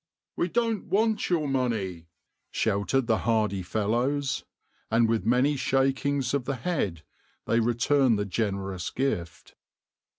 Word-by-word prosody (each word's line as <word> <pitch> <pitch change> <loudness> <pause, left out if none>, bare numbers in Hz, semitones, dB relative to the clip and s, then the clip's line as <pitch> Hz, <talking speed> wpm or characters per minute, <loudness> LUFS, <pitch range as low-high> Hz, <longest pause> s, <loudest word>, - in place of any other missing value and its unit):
"We 170 - 0
don't 230 0 0
want 220 +1 +1
your 165 -5 +1
money," 110 -11 -1 0.4
shouted 110 +6 0
the 110 -1 +2
hardy 110 -4 +1
fellows, 120 +9 -1 0.5
and 115 +1 +3
with 110 -3 0
many 130 +5 +3
shakings 135 0 +1
of 140 -3 0
the 135 - -1
head 125 - -2 0.4
they 115 - +2
returned 120 +1 +3
the 105 - -1
generous 95 -2 -2
gift. 90 -11 -3
120 Hz, 125 wpm, -27 LUFS, 105-140 Hz, 0.5 s, and